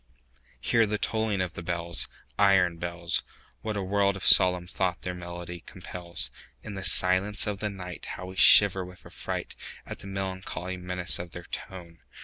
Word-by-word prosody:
Hear 115 - +2
the 105 +1 -1
tolling 110 -3 -1
of 90 -2 -3
the - - -7
bells, 85 0 -2 0.3
Iron 95 -4 +4
bells! 85 0 -2 0.4
What 110 -2 -3
a 100 - -2
world 100 +1 +1
of 95 - -5
solemn 90 -1 +7
thought 90 -1 -2
their 90 - -3
monody 85 0 -8
compels! 90 -2 -3 0.3
In 105 - -7
the 95 -1 -6
silence 95 +3 +4
of 105 -2 -3
the 105 - -2
nightHow 90 -2 -8
we 95 +1 -9
shiver 95 0 +7
with 90 0 -13
affrightAt - - -6 0.4
the 95 - -10
melancholy 95 -1 -5
menace 90 0 -2
of 85 -1 -8
their 90 - -8
tone! 85 -2 -8
90 Hz, 160 wpm, -27 LUFS, 90-100 Hz, 0.4 s, solemn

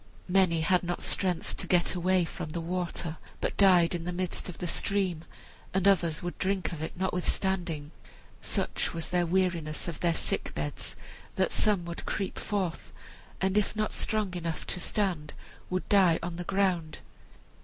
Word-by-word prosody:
Many 180 -3 +3
had 180 +3 +3
not 175 0 -3
strength 180 -4 +2
to - - -5
get 175 -1 +3
away 185 0 +2
from 170 -1 -6
the 170 - -3
water, 170 -1 -3 0.2
but - - -1
died 185 -3 +6
in 170 -1 -3
the 180 - -3
midst 180 +1 -2
of 175 - -8
the - - -4
stream, 180 -2 0 0.5
and 190 0 +3
others 170 -6 +3
would 175 - -5
drink 190 -2 0
of 160 - -6
it 160 - -5
notwithstanding. 180 -4 -1 0.5
Such - - -1
was 165 - -3
their 175 -1 +1
weariness 170 -4 0
of 170 - -4
their 170 -2 +2
sick - - -2
beds 75 -1 -3 0.4
that - - +1
some 200 -5 +3
would 170 0 -6
creep 195 -2 -2
forth, 190 -5 -2 0.5
and 190 0 +1
if 210 - -2
not 215 0 -1
strong 215 -4 +1
enough 170 -2 -3
to - - -4
stand, 175 -6 -1 0.3
would 185 0 -2
die 185 -5 +5
on 170 0 -4
the 175 - -5
ground. 185 -5 0
180 Hz, 170 wpm, -29 LUFS, 170-190 Hz, 0.5 s, died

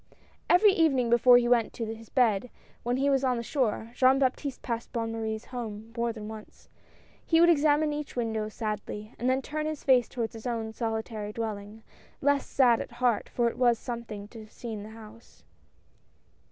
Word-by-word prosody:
Every 400 +3 +6
evening 270 -9 +2
before 245 +1 +7
he 240 0 +2
went 240 -3 +2
to 230 - -4
his 225 -1 -13
bed, 245 -3 +2 0.3
when 245 +1 -1
he 275 +1 +1
was 270 -1 +2
on 250 -2 +1
shore, 230 -3 -1
Jean 260 +1 +4
Baptiste 270 +1 -1
passed 235 -1 -4
Bonne 230 -1 -2
Marie's 220 -1 -4
house 230 -5 -6 0.2
more 235 0 0
than 215 -2 -8
once. 220 -1 -11 0.5
He 325 - +3
would 345 +1 +7
examine 300 -1 +3
each 295 -1 -5
win 230 -2 -1
dow 215 -1 -2
sadly, 215 0 -5
and 245 - +1
then 260 +1 +1
turn 305 0 -3
his 310 -2 -5
face 255 -4 +4
towards 230 -3 -3
his 225 +2 -7
own 225 -2 -3
solitary 220 -2 -3
dwelling, 215 -1 -5 0.4
less 285 0 +1
sad 245 -4 +4
at - - -8
heart, 245 -3 0
for 240 -1 +1
it 235 - -4
was 240 -2 +4
some 235 -1 -5
thing 210 -3 -8
to 230 - -11
have 215 0 -13
seen 225 -3 -6
the 210 - -9
house. 225 +1 -14
235 Hz, 195 wpm, -28 LUFS, 220-260 Hz, 0.5 s, before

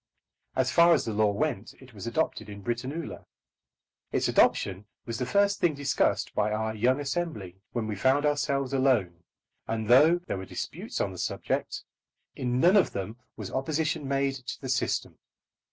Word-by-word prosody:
As 130 0 +1
far 170 +3 +6
as 140 - -1
the 110 - -2
law 105 0 +3
went 115 -2 -2
it 130 -2 -16
was 100 +1 -7
adopted 115 -5 -1
in 100 -1 -9
Britannula. 130 +9 -4 0.8
Its - - +1
adoption 95 +2 +2 0.2
was 115 -1 -4
the 125 - -2
first 200 +6 +2
thing 165 -4 +2
discussed 140 -1 0
by 105 - +1
our 110 +1 -1
young 125 +5 +2
Assembly, 140 - -3 0.2
when 120 -3 -1
we 110 -1 -3
found 135 +8 +2
ourselves 140 -2 0
alone; 120 -11 +2 0.5
and 110 -1 -2
though 150 +9 +6
there - - -3
were 95 - -6
disputes - - -5
on - - 0
the - - -9
subject, - - -2 0.5
in 125 0 -1
none 180 +8 +6
of 195 - +3
them 100 +4 -4 0.2
was - - -6
opposition 150 +2 -1
made 135 0 +1
to 130 - -7
the 130 - -6
system. 125 -1 -1
130 Hz, 170 wpm, -28 LUFS, 110-145 Hz, 0.8 s, far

